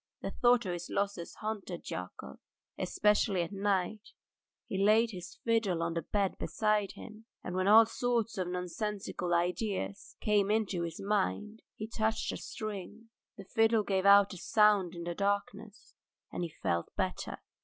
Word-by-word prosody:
The - - -3
thought 240 -1 +3
of 180 - -2
his 175 0 -6
losses 200 -4 -2
haunted 210 -5 -5
Yakov, 90 -7 -7 0.4
especially 210 -3 +2
at 170 - -6
night; 200 +1 -1 0.5
he 195 0 -1
laid 220 +3 +4
his 180 -2 -8
fiddle 215 -7 +1
on 165 0 -1
the 170 - -1
bed 200 +3 -1
beside 215 -2 0
him, 220 0 -11 0.2
and - - -5
when 185 +1 +1
all 220 +2 +9
sorts 230 -1 -1
of 185 - -1
nonsensical 180 0 -3
ideas 175 - -1
came 205 -2 +2
into 210 -4 +1
his 165 -1 -4
mind 210 - -1
he 215 - -5
touched 220 0 -1
a - - -4
string; 215 +2 -7 0.3
the 195 - -9
fiddle 225 +2 +3
gave 195 -1 +1
out 200 0 +7
a - - -8
sound 205 -2 +3
in 170 - -6
the 175 0 -3
darkness, 205 +2 -3 0.4
and - - -4
he 170 - -2
felt 85 - -2
better. - - -2
200 Hz, 160 wpm, -32 LUFS, 180-215 Hz, 0.5 s, all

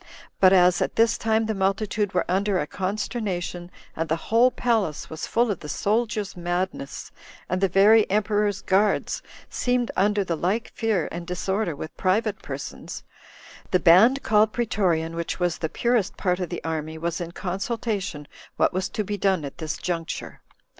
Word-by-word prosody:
But 185 -1 +7
as 180 -1 +5
at - - -1
this 230 0 +4
time 220 0 +1
the 220 - -1
multitude 195 +1 -1
were 180 - +2
under 195 +1 +1
a 150 - 0
consternation, 185 -1 -3 0.3
and 165 0 -2
the 160 - +2 0.2
whole 235 +3 +6
palace 220 -14 -1
was 160 0 -5
full 235 -1 +2
of 190 - -3
the 150 - -8
soldiers' 215 0 -1
madness, 175 -4 -3 0.4
and 185 +1 -1
the 195 - +4
very 205 +4 +5
emperor's 205 0 +1
guards 200 +2 +1 0.3
seemed 245 -1 0
under 205 +1 +2
the 175 -3 -2
like 195 +9 -1
fear 220 -8 0
and 170 0 -6
disorder 185 0 -1
with 155 +2 -8
private 205 +3 0
persons, - - -7 0.7
the 185 - +3
band 220 +12 +6
called 215 0 +3
pretorian, 180 -9 0
which 170 +2 -3
was 175 -2 0
the 160 - -2
purest 235 +1 0
part 180 -2 0
of 180 - -3
the 175 - -5
army, 160 -1 -3
was 170 +1 -3
in 170 -1 -5
consultation 195 -3 -3 0.3
what - - +2
was 185 +1 -1
to 215 - -2
be 205 0 -4
done 190 -6 +1
at 140 - -9
this 160 -1 -3
juncture. 165 -2 -4
190 Hz, 170 wpm, -24 LUFS, 175-215 Hz, 0.7 s, But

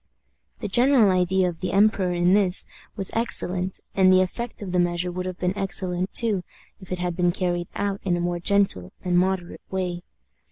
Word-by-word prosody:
The - - -2
general 240 0 +4
idea 185 0 +2
of 170 -2 -5
the 185 - -3
emperor 200 -2 +3
in 175 +1 +2
this 195 -2 +3 0.3
was 195 -3 -2
excellent, 185 -5 0
and 185 -1 +5
the 185 0 +6
effect 230 +4 -6
of 190 - -6
the 180 - +1
measure 175 0 0
would 180 +1 -4
have 185 -1 -5
been 180 +1 -1
excellent 185 -1 -1
too 220 -5 +1 0.4
if 190 -2 -14
it 185 - -1
had 180 -1 -2
been 175 0 +2
carried 175 -1 -2
out 200 -1 -2
in 180 -2 0
a - - -3
more 175 0 -1
gentle 185 - +1
and 180 -1 +1
moderate 185 0 0
way. 180 -2 -3
185 Hz, 195 wpm, -24 LUFS, 175-195 Hz, 0.4 s, the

